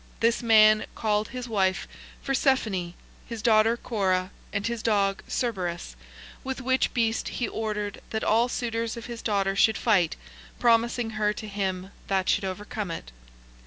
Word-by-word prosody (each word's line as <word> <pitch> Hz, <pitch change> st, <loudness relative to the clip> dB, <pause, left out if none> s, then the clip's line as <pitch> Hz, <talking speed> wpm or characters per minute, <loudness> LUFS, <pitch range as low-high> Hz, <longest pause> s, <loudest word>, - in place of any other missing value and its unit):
This 230 Hz, 0 st, +2 dB
man 215 Hz, -2 st, +6 dB
called 210 Hz, -1 st, 0 dB
his 250 Hz, 0 st, -6 dB
wife 190 Hz, -4 st, 0 dB, 0.4 s
Phersephone, 225 Hz, -10 st, +1 dB, 0.3 s
his 230 Hz, -2 st, -6 dB
daughter 225 Hz, 0 st, +4 dB
Cora, 190 Hz, -5 st, 0 dB, 0.2 s
and 200 Hz, 0 st, -2 dB
his 235 Hz, -1 st, -2 dB
dog 200 Hz, -3 st, +1 dB
Cerberus, 185 Hz, -8 st, -2 dB, 0.5 s
with 265 Hz, -1 st, -4 dB
which 260 Hz, 0 st, +1 dB
beast 230 Hz, -1 st, +1 dB
he 240 Hz, -, -2 dB
ordered 210 Hz, -2 st, -3 dB
that 220 Hz, -, -2 dB
all 230 Hz, +3 st, +3 dB
suitors 230 Hz, -1 st, -2 dB
of 235 Hz, -, -7 dB
his 235 Hz, -2 st, -7 dB
daughter 195 Hz, -3 st, 0 dB
should 220 Hz, +2 st, +4 dB
fight, 190 Hz, -8 st, +2 dB, 0.4 s
promising 235 Hz, 0 st, +2 dB
her 210 Hz, -1 st, 0 dB
to 215 Hz, -, -7 dB
him 190 Hz, -2 st, -3 dB, 0.2 s
that 190 Hz, -1 st, 0 dB
should -, -, +2 dB
overcome 205 Hz, +1 st, -4 dB
it. 165 Hz, -, -6 dB
215 Hz, 150 wpm, -26 LUFS, 195-230 Hz, 0.5 s, man